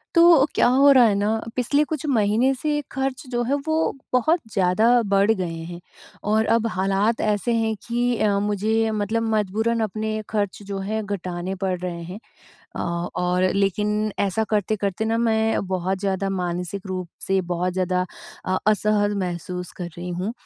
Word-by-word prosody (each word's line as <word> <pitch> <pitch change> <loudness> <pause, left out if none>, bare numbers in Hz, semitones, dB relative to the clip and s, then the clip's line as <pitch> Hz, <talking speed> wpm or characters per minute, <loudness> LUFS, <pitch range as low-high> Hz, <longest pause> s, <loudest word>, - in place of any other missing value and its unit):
तो 335 -5 +7
क्या - - +4
हो 275 +3 +6
रहा 255 -3 +7
है 210 - +3
ना, 210 +2 0 0.2
पिछले 260 +4 +2
कुछ 310 -3 -3
महीने 230 0 +2
से 300 -1 0
खर्च 265 -1 -2
जो 240 -1 0
है 260 +4 0
वो 315 - +1 0.4
बहुत 315 +7 +3
ज़्यादा 190 +2 +2 0.2
बढ़ 200 +2 +3
गए 190 -4 -2 0.2
हैं। 175 0 -8 0.5
और 220 +1 +3
अब 230 0 +1
हालात 195 +4 +1
ऐसे 210 +2 0
हैं 225 -1 +1
कि 240 +1 0
अ, 205 -2 +2
मुझे 215 +2 +1
मतलब 215 +1 -1
मजबूरन 220 +3 0
अपने 215 +1 -3
खर्च 205 -2 -2
जो 200 -1 -5
है 220 +1 -1
घटाने 185 -2 -4
पड़ 185 -2 0
रहे 175 -1 -5
हैं। 180 +4 -7 0.6
अ, - - -3 0.3
और 180 0 0
लेकिन 210 +2 0
ऐसा 200 +2 +1
करते-करते 205 0 -1
ना 225 +1 0
मैं 225 -3 +1
बहुत 185 0 -1
ज़्यादा 195 0 -1
मानसिक 180 +2 -4
रूप 185 -2 -4 0.2
से 195 0 +2
बहुत 180 +1 -1
ज़्यादा 180 0 0 0.4
अ, 185 0 0
असहज 210 -1 +2
महसूस 180 0 -5
कर 180 - -4
रही 175 +1 -6
हूँ, 180 +5 -3
205 Hz, 165 wpm, -23 LUFS, 185-225 Hz, 0.6 s, तो